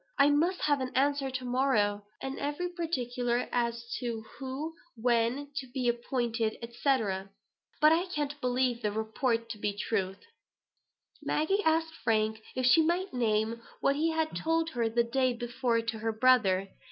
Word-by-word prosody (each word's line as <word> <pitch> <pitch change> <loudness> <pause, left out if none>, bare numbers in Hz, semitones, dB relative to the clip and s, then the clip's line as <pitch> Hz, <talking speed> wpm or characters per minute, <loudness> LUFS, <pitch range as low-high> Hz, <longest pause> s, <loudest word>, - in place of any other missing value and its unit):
I 285 +1 +6
must 335 +6 +2
have 290 -2 +2
an 255 0 -3
answer 280 0 +2
to 260 -1 -4
morrow, 245 -5 +2 0.2
and 270 0 -4
every 295 +5 -2
particular 250 -8 -1
as 235 -1 0 0.2
to 235 -3 -3 0.2
who 275 +4 -4 0.2
when 240 +4 +1
to 270 -2 -3
be 250 0 -2
appointed, 235 -2 0
&c. 250 +4 +1 0.8
But 305 +1 +7
I 340 +3 +2
can't 295 -2 -3
believe 250 -1 +1
the 210 - 0
report 230 +2 -1
to 210 - -7
be 205 -1 -2
true." 195 -3 -1 1.1
Maggie 390 +7 +1
asked 320 0 +2
Frank 220 -1 +1
if 255 0 0
she 255 +6 +7
might 350 +3 0
name 225 -1 0 0.2
what 275 - +2
he 315 +3 +1
had 320 -1 -1
told 325 0 0
her 235 -4 0
the 235 +1 +2
day 255 +2 +1
before 240 0 0
to 225 -1 -4
her 225 +1 -1
brother. 215 -5 +3
250 Hz, 160 wpm, -30 LUFS, 230-290 Hz, 1.1 s, But